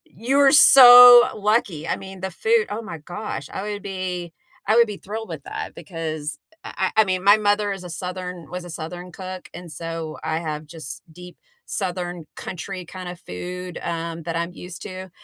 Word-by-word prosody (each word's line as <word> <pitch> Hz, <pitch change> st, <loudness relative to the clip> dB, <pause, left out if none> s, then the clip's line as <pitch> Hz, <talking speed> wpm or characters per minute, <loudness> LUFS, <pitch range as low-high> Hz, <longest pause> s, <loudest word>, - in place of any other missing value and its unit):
You're 270 Hz, +5 st, +3 dB
so 245 Hz, -3 st, +10 dB
lucky. 210 Hz, -7 st, 0 dB
I -, -, -1 dB
mean, 190 Hz, -1 st, -11 dB
the 190 Hz, -, -3 dB
food, 220 Hz, +4 st, +1 dB
oh 215 Hz, +3 st, -5 dB
my 170 Hz, -6 st, -8 dB
gosh! 175 Hz, -3 st, -7 dB
I 190 Hz, -, -5 dB
would 205 Hz, -1 st, -5 dB
be 185 Hz, -3 st, -5 dB, 0.4 s
I 215 Hz, -, +3 dB
would 235 Hz, 0 st, +6 dB
be 210 Hz, -2 st, -6 dB
thrilled 220 Hz, +2 st, -7 dB
with 160 Hz, -4 st, -7 dB
that -, -, -6 dB
because, 155 Hz, -2 st, -5 dB, 0.3 s
a -, -, -8 dB
a -, -, -2 dB
I 220 Hz, -, +7 dB
mean, 185 Hz, -2 st, -2 dB
my 205 Hz, +2 st, +6 dB
mother 205 Hz, -1 st, +1 dB
is 195 Hz, -2 st, -6 dB
a 180 Hz, -, -8 dB
Southern 180 Hz, -2 st, -6 dB
was 180 Hz, 0 st, -5 dB
a -, -, -10 dB
Southern 175 Hz, +2 st, -7 dB
cook, 185 Hz, +1 st, -8 dB
and 175 Hz, -2 st, -9 dB
so 165 Hz, 0 st, -6 dB
I 160 Hz, 0 st, -1 dB
have, 155 Hz, -2 st, -5 dB
just, 155 Hz, -3 st, -8 dB
deep 180 Hz, +2 st, -12 dB, 0.3 s
southern 180 Hz, -3 st, -4 dB
country 185 Hz, +1 st, -7 dB
kinda 180 Hz, 0 st, -8 dB
food, 180 Hz, 0 st, -7 dB
um, 165 Hz, 0 st, -4 dB
that 165 Hz, +1 st, -4 dB
I'm 170 Hz, +1 st, -2 dB
used 180 Hz, 0 st, -10 dB
to, 185 Hz, -1 st, -8 dB
180 Hz, 190 wpm, -22 LUFS, 170-205 Hz, 0.4 s, so